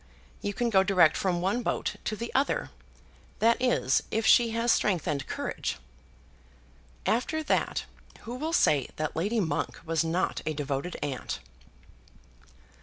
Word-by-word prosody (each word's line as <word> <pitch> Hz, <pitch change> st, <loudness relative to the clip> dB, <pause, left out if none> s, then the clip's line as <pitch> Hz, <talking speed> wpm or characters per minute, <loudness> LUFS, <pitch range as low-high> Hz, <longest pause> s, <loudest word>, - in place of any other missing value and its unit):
You 205 Hz, -, -1 dB
can 240 Hz, +1 st, 0 dB
go 190 Hz, -2 st, +6 dB
direct 185 Hz, -5 st, +4 dB
from 180 Hz, -3 st, 0 dB
one 195 Hz, +7 st, 0 dB
boat -, -, -2 dB
to 215 Hz, -, -1 dB
the 235 Hz, +2 st, -6 dB
other, 270 Hz, +2 st, +1 dB, 0.7 s
that 230 Hz, +2 st, +3 dB
is, 245 Hz, -, +2 dB
if 220 Hz, 0 st, -1 dB
she 235 Hz, -1 st, +6 dB
has 230 Hz, +1 st, +1 dB
strength 185 Hz, -8 st, +1 dB
and 140 Hz, -3 st, -2 dB
courage." -, -, -3 dB, 1.3 s
After 310 Hz, +7 st, 0 dB
that, -, -, 0 dB, 0.4 s
who 235 Hz, -, -7 dB
will 305 Hz, +6 st, -3 dB
say 150 Hz, -, +3 dB
that 155 Hz, 0 st, -3 dB
Lady 205 Hz, +8 st, 0 dB
Monk 175 Hz, -5 st, -1 dB
was 165 Hz, 0 st, +1 dB
not 170 Hz, +3 st, -1 dB
a 155 Hz, -, -2 dB
devoted 145 Hz, +4 st, -3 dB
aunt? 135 Hz, -3 st, -3 dB
195 Hz, 145 wpm, -28 LUFS, 160-235 Hz, 1.3 s, go